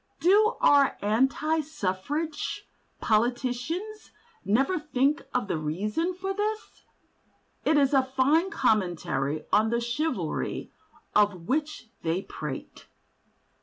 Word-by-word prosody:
Do 420 Hz, +6 st, +4 dB
our 285 Hz, -, +5 dB
anti 270 Hz, +9 st, +2 dB
suffrage 295 Hz, -, -3 dB, 0.3 s
politicians 250 Hz, -, -1 dB, 0.3 s
never 270 Hz, -, +2 dB
think 295 Hz, -1 st, +1 dB
of 250 Hz, -5 st, -1 dB
the 160 Hz, -, -1 dB
reason 210 Hz, -, -2 dB
for 385 Hz, +2 st, -3 dB
this? 425 Hz, +2 st, -3 dB, 0.8 s
It 310 Hz, -, +4 dB
is 280 Hz, -1 st, +3 dB
a 270 Hz, -, +6 dB
fine 270 Hz, +7 st, +2 dB
commentary 160 Hz, -, 0 dB
on 215 Hz, +1 st, +4 dB
the 235 Hz, +1 st, +1 dB
"Chivalry" 265 Hz, +7 st, -2 dB, 0.4 s
of 200 Hz, -5 st, +2 dB
which 295 Hz, -5 st, -2 dB
they 170 Hz, +4 st, -1 dB
prate. -, -, -7 dB
265 Hz, 105 wpm, -27 LUFS, 210-320 Hz, 0.8 s, a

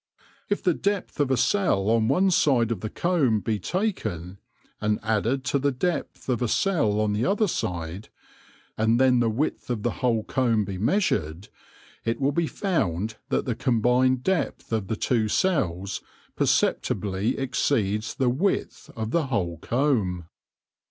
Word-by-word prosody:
If 205 Hz, -, -1 dB
the 180 Hz, -, +3 dB
depth 200 Hz, -1 st, -2 dB
of 145 Hz, -2 st, +2 dB
a 130 Hz, -, +2 dB
cell 145 Hz, -, +2 dB
on 115 Hz, -1 st, +3 dB
one 185 Hz, +9 st, +3 dB
side 125 Hz, -9 st, +3 dB
of 110 Hz, -, -1 dB
the 110 Hz, -, -4 dB
comb 145 Hz, -11 st, +1 dB
be 105 Hz, +1 st, -2 dB
taken, 95 Hz, -, -3 dB, 0.4 s
and 105 Hz, 0 st, +1 dB
added 110 Hz, +4 st, 0 dB
to 140 Hz, +1 st, 0 dB
the 140 Hz, +1 st, +1 dB
depth 140 Hz, +3 st, -3 dB
of 125 Hz, -3 st, 0 dB
a 120 Hz, -, +1 dB
cell 115 Hz, -, +1 dB
on 105 Hz, -1 st, +1 dB
the 105 Hz, +3 st, 0 dB
other 210 Hz, +4 st, +2 dB
side, 90 Hz, -, -4 dB, 0.7 s
and 110 Hz, +2 st, +3 dB
then 130 Hz, -2 st, +4 dB
the 115 Hz, -1 st, +2 dB
width 130 Hz, +6 st, -2 dB
of 115 Hz, -4 st, -2 dB
the 120 Hz, -, +1 dB
whole 115 Hz, -3 st, +2 dB
comb 115 Hz, -5 st, +1 dB
be 95 Hz, -1 st, -5 dB
measured, 100 Hz, -, 0 dB, 0.5 s
it 115 Hz, 0 st, -1 dB
will 140 Hz, +1 st, +2 dB
be 165 Hz, +2 st, 0 dB
found 110 Hz, -, -1 dB
that -, -, 0 dB
the 125 Hz, -, 0 dB
combined 125 Hz, +2 st, +2 dB
depth 190 Hz, -10 st, -1 dB
of 110 Hz, -4 st, -1 dB
the 110 Hz, -, -1 dB
two 110 Hz, 0 st, +1 dB
cells 100 Hz, -, 0 dB, 0.3 s
perceptibly 100 Hz, +2 st, 0 dB
exceeds 115 Hz, -5 st, 0 dB
the 130 Hz, -, +1 dB
width 180 Hz, +11 st, -1 dB
of 110 Hz, 0 st, -3 dB
the 165 Hz, -4 st, +1 dB
whole 90 Hz, -, -2 dB
comb. 110 Hz, -, 0 dB
115 Hz, 160 wpm, -25 LUFS, 105-140 Hz, 0.7 s, then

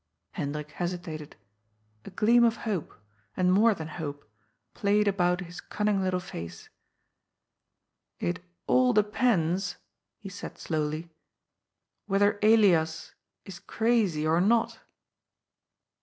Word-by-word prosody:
Hendrik 150 Hz, -3 st, -4 dB
hesitated. 175 Hz, -4 st, -5 dB, 0.7 s
A -, -, -7 dB
gleam 230 Hz, +5 st, +4 dB
of 230 Hz, -1 st, +3 dB
hope, 200 Hz, -8 st, -3 dB, 0.4 s
and 185 Hz, 0 st, +3 dB
more 215 Hz, +3 st, +4 dB
than 160 Hz, -3 st, -6 dB
hope, 145 Hz, -6 st, -7 dB, 0.5 s
played 210 Hz, 0 st, +2 dB
about 180 Hz, -2 st, +1 dB
his 175 Hz, -1 st, -8 dB
cunning 210 Hz, -2 st, -1 dB
little 185 Hz, -1 st, 0 dB
face. 85 Hz, -, -9 dB, 0.7 s
" -, -, -57 dB
It 180 Hz, 0 st, -4 dB, 0.2 s
all 255 Hz, -1 st, +3 dB
depends," 205 Hz, -5 st, +1 dB, 0.4 s
he 205 Hz, -, -10 dB
said 200 Hz, -, -8 dB
slowly, 155 Hz, +1 st, -3 dB, 0.5 s
" -, -, -58 dB
whether 205 Hz, +1 st, +2 dB
Elias 195 Hz, -8 st, +3 dB, 0.3 s
is 190 Hz, -2 st, -9 dB
crazy 220 Hz, -11 st, 0 dB
or 160 Hz, +2 st, +3 dB
not." 225 Hz, +4 st, +2 dB
185 Hz, 110 wpm, -28 LUFS, 160-210 Hz, 0.7 s, gleam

